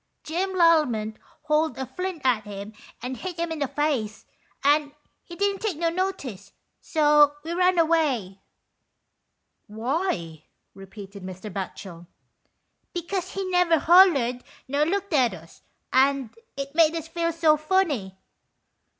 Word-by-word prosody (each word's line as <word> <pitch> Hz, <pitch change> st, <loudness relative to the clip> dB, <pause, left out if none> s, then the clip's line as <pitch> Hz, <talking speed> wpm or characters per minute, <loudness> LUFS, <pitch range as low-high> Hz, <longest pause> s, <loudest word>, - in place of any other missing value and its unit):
Jim 375 Hz, +4 st, -2 dB
Lallement 300 Hz, -12 st, +3 dB, 0.3 s
hauled 305 Hz, +1 st, +1 dB
a 265 Hz, -, -3 dB
flint 365 Hz, 0 st, -5 dB
at 240 Hz, -4 st, +2 dB
him 205 Hz, +1 st, -8 dB, 0.3 s
and 255 Hz, +1 st, -4 dB
hit 360 Hz, +6 st, -6 dB
him 335 Hz, 0 st, -2 dB
in 320 Hz, -, -4 dB
the 280 Hz, -, 0 dB
face, 260 Hz, -8 st, -2 dB, 0.4 s
and 290 Hz, 0 st, +3 dB, 0.3 s
he 345 Hz, -, -11 dB
didn't 400 Hz, +1 st, 0 dB
take 415 Hz, -8 st, -2 dB
no 335 Hz, 0 st, 0 dB
notice, 280 Hz, -, -4 dB, 0.3 s
so 295 Hz, -2 st, +4 dB
we 325 Hz, -, -5 dB
run 360 Hz, +1 st, +2 dB
away." 295 Hz, -, +1 dB, 0.6 s
" -, -, -52 dB
Why? 220 Hz, -, -3 dB
" -, -, -51 dB
repeated 195 Hz, +1 st, -11 dB
Mr. 185 Hz, +2 st, -8 dB
Batchel. 185 Hz, -3 st, -7 dB, 0.4 s
" -, -, -50 dB
Because 350 Hz, +2 st, -3 dB
he 390 Hz, 0 st, -3 dB
never 355 Hz, -2 st, +4 dB
hollered 290 Hz, -8 st, +5 dB, 0.2 s
nor 285 Hz, +3 st, +1 dB
looked 400 Hz, +1 st, -2 dB
at 250 Hz, -9 st, +3 dB
us, 165 Hz, -1 st, -16 dB, 0.3 s
and 265 Hz, -3 st, +2 dB, 0.2 s
it 275 Hz, 0 st, -5 dB
made 325 Hz, 0 st, +4 dB
us 330 Hz, -1 st, -4 dB
feel 335 Hz, 0 st, -1 dB
so 320 Hz, -2 st, +3 dB
funny." 300 Hz, -, 0 dB
295 Hz, 140 wpm, -25 LUFS, 220-335 Hz, 0.6 s, hollered